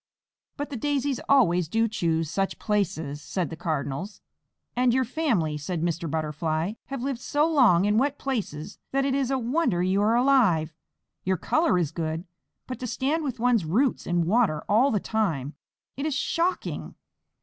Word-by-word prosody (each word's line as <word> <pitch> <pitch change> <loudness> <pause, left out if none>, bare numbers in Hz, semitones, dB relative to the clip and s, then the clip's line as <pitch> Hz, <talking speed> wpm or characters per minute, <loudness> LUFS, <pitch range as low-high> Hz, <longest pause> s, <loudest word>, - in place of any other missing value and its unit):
"But 290 0 -4
the 270 - -3
Daisies 280 0 0
always 180 - +4
do 225 +7 +1
choose 165 -7 0
such 195 +5 -1
places," 160 -9 -1
said 175 +1 -3
the - - -4
Cardinals. 160 +5 -3 0.6
"And 250 0 +3
your 260 0 +2
family," 215 - 0
said 165 +2 -3
Mr. 170 -1 -1
Butterfly, 155 +3 -1
"have 270 -2 -5
lived 270 -3 -2
so 295 +4 +1
long 250 - +4
in 210 +2 +3
wet 285 +2 0
places 210 - -4
that 275 0 +2
it 275 - +1
is 270 -2 0
a 270 - +1
wonder 245 - +1
you 190 +2 +2
are 220 +3 +3
alive. 230 - +3 0.5
Your 190 0 +1
color 315 - +2
is 170 -5 0
good, 160 +1 -3 0.4
but 255 - -6
to 250 - -4
stand 285 +7 -1
with 260 -5 -4
one's 240 -4 +3
roots 225 - +1
in 175 -1 +1
water 195 -5 +2
all 230 +7 +4
the 215 - +1
time! 165 - -1 0.4
It 280 +3 -2
is 300 - -1
shocking." 340 +5 -1
215 Hz, 170 wpm, -26 LUFS, 165-265 Hz, 0.6 s, always